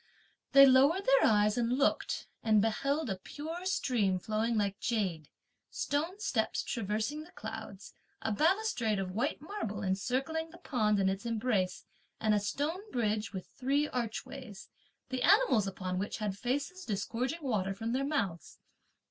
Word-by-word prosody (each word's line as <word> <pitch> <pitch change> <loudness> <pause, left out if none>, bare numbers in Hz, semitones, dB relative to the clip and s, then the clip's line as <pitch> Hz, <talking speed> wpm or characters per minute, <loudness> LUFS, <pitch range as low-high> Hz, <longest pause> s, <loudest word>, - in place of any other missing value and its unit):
They 275 0 +10
lowered 275 +9 +5
their - - +5
eyes 210 +1 +3
and 235 +1 +1
looked, 280 - +1 0.2
and 215 -2 +4
beheld 275 +8 0
a 190 - -2
pure 325 - -6
stream 230 - +1
flowing 220 +4 -1
like 200 -1 0
jade, 185 - -1 0.4
stone 325 +7 -2
steps 225 - 0
traversing 220 +5 -2
the 315 - -12
clouds, 215 -2 -8 0.3
a 220 - -2
balustrade 310 - +2
of 190 -1 -2
white 255 +9 -1
marble 220 - -4
encircling 260 +12 -1
the 345 - -13
pond 215 - +1
in 195 - +3
its 195 +4 -1
embrace, 220 -5 0 0.3
and 215 -1 +2
a 210 - +3
stone 290 - -2
bridge 215 -3 0
with 190 -2 -6
three 280 +3 0
archways, 235 -1 -5 0.4
the 255 -1 -2
animals 375 - +4
upon 185 -1 -3
which 200 - -3
had 210 -3 -2
faces 280 - -2
disgorging 245 - -2
water 195 -7 0
from 225 +3 -3
their 265 +2 +1
mouths. 225 - -2
230 Hz, 150 wpm, -32 LUFS, 205-285 Hz, 0.4 s, They